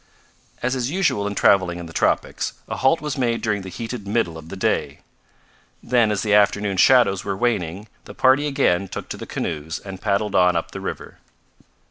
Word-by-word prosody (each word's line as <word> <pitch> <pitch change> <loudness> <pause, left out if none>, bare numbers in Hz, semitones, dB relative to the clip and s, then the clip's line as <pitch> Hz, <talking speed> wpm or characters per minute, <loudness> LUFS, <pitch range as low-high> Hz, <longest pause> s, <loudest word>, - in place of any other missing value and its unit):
As 125 +1 +1
is 130 -1 -1
usual 155 - 0
in 105 - -4
traveling 95 -4 +3
in 85 - -7
the 80 - -11
tropics, - - 0
a - - -4
halt 135 +5 +2
was 150 -2 -4
made 120 -2 +1
during 105 -2 0
the 95 - -8
heated 115 +2 -6
middle 100 -6 0
of 80 0 -10
the 95 - -6
day. 95 - -1 0.8
Then, 120 -3 +3
as 105 - -1
the 105 -2 +1
afternoon 105 -1 +3
shadows 115 -2 +4
were 100 -1 -3
waning, 100 -4 -1 0.2
the - - -11
party 135 +3 +3
again 100 -10 +1
took - - -7
to - - -5
the - - -8
canoes 80 +1 -4
and 95 -2 -9
paddled 105 0 0
on 90 -2 +4
up 85 - -2
the - - -7
river. - - -7
105 Hz, 195 wpm, -22 LUFS, 95-120 Hz, 0.8 s, shadows